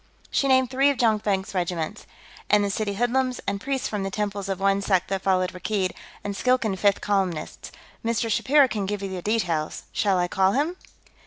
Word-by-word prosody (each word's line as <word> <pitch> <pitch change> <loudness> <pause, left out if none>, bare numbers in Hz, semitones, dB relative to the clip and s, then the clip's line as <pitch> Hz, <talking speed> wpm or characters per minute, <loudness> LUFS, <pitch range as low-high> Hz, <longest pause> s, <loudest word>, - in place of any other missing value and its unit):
She 275 - +2
named 260 -2 +3
three 270 +2 +4
of 280 - 0
Jonkvank's 210 -5 +1
regiments. 175 +1 -3 0.4
"And 205 0 +5
the 200 - 0
city 200 0 -2
hoodlums, 250 +3 0
and 200 0 -2
priests 270 +1 -1
from 210 -2 -3
the 195 - -2
temples 200 0 -3
of 195 -1 -2
one 195 0 +2
sect 190 -3 +1
that 195 -1 -1
followed 185 -1 +1
Rakkeed, 185 0 -1 0.3
and 200 -1 -3
Skilkan 250 -4 +1
fifth 200 +1 +2
columnists. 190 -6 -2 0.3
Mr. 230 0 0
Shapiro 275 +5 +4
can 210 -5 -3
give 205 0 -3
you 195 - -3
the 185 -1 -5
details. 175 -7 -1
Shall 195 -3 +2
I 175 0 +1
call 190 +2 +2
him?" 300 +7 0
200 Hz, 190 wpm, -25 LUFS, 190-230 Hz, 0.4 s, And